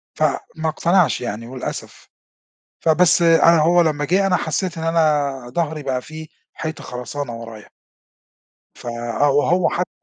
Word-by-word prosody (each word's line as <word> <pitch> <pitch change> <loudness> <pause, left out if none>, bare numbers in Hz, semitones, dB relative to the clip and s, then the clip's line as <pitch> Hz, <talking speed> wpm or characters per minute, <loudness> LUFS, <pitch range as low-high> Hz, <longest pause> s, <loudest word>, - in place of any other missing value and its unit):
فما 160 0 -1
اقتنعش 170 -4 +2
يعني 115 -1 -5
للأسف، - - -7 0.7
فبس، 170 +2 +3
أنا 165 0 +5
هو 175 +2 +4
لما 150 -2 0
جِه 190 +6 +2
أنا 180 -2 +2
حسّيت 170 +2 -3
إن 160 - -4
أنا 155 -4 +2 0.2
ضهري 155 +2 -2
بقى 130 -2 -2
في 155 0 -10 0.3
حيطة 160 -1 -6
خرسانة 125 0 -6
ورايا. 115 -2 -10 1.1
ف - - -14
آه 120 +4 0
وهو 165 +6 +2
حتى 180 +1 -2
155 Hz, 140 wpm, -20 LUFS, 135-170 Hz, 1.1 s, أنا